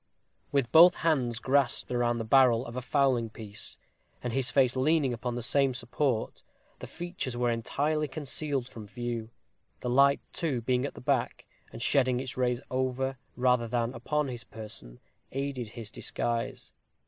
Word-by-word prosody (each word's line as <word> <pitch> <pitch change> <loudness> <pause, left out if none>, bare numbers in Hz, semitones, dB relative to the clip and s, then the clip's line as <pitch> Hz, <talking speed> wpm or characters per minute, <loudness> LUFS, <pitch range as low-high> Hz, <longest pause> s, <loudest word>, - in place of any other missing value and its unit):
With 140 -4 +1
both 175 +3 +8
hands 130 -8 +1
grasped 135 +1 +1
round 120 -1 +1
the - - -2
barrel 125 0 +5
of 120 - -8
a 125 - -2
fowling 130 -4 +1
piece, 105 -1 -7 0.5
and 125 -2 -2
his 130 -1 +2
face 130 -2 +3
leaning 140 0 +2
upon 120 +1 -3
the 120 - -3
same 135 +1 +3
support, 125 -1 -1 0.4
the - - -7
features 175 -8 -5
were 120 -1 +1
entirely 150 +7 0
concealed 140 -2 -2
from 110 -4 -10
view; 120 0 -4 0.5
the 125 - -2
light, 140 +2 +5
too, 145 -8 -1
being 125 +2 +1
at - - -10
the - - -10
back, 130 -2 -1 0.3
and 115 - -6
shedding 130 -2 +3
its 130 -1 -5
rays 125 -1 0
over, 130 0 -1 0.2
rather 125 -2 +2
than 120 +1 -1
upon 150 +5 -1
his 120 -3 -5
person, 105 - -10 0.3
aided 135 -4 -3
his 115 -3 -7
disguise. 115 +1 -3
125 Hz, 160 wpm, -29 LUFS, 120-140 Hz, 0.5 s, both